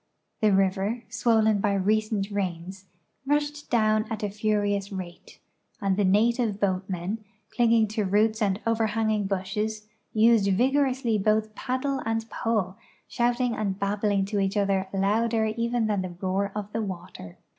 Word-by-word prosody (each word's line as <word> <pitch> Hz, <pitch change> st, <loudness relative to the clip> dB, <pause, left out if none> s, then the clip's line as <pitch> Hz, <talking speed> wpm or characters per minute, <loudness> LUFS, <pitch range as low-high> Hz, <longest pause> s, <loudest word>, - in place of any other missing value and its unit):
The 215 Hz, -1 st, +4 dB
river, 195 Hz, +4 st, +1 dB
swollen 220 Hz, -1 st, +2 dB
by 200 Hz, 0 st, +1 dB
recent 210 Hz, +1 st, 0 dB
rains, 190 Hz, -1 st, -4 dB, 0.4 s
rushed 295 Hz, 0 st, -1 dB
down 215 Hz, -2 st, +2 dB
at 215 Hz, -1 st, -4 dB
a 205 Hz, -, -1 dB
furious 205 Hz, -1 st, 0 dB
rate, 185 Hz, -3 st, -8 dB, 0.4 s
and 195 Hz, -1 st, +1 dB
the 205 Hz, -, +1 dB
native 215 Hz, +2 st, +2 dB
boatmen, 190 Hz, +1 st, -2 dB, 0.3 s
clinging 230 Hz, -2 st, +4 dB
to 215 Hz, 0 st, -1 dB
roots 215 Hz, +3 st, +2 dB
and 200 Hz, -1 st, +1 dB
over 230 Hz, -1 st, +1 dB
hanging 215 Hz, -1 st, 0 dB
bushes, 210 Hz, +3 st, -3 dB, 0.2 s
used 220 Hz, -2 st, +4 dB
vigorously 255 Hz, -1 st, +1 dB
both 215 Hz, +1 st, +1 dB
paddle 260 Hz, +4 st, -2 dB
and 225 Hz, 0 st, -2 dB
pole, 205 Hz, -5 st, -1 dB, 0.3 s
shouting 240 Hz, 0 st, 0 dB
and 200 Hz, -3 st, -2 dB
babbling 200 Hz, 0 st, 0 dB
to 205 Hz, +1 st, -2 dB
each 195 Hz, +1 st, 0 dB
other 195 Hz, -1 st, +1 dB
louder 220 Hz, +3 st, +1 dB
even 230 Hz, +1 st, 0 dB
than 205 Hz, -3 st, 0 dB
the 180 Hz, -2 st, -6 dB
roar 195 Hz, +1 st, -1 dB
of 210 Hz, 0 st, -5 dB
the 225 Hz, -, -1 dB
water. 175 Hz, -, -7 dB
210 Hz, 145 wpm, -26 LUFS, 195-225 Hz, 0.4 s, The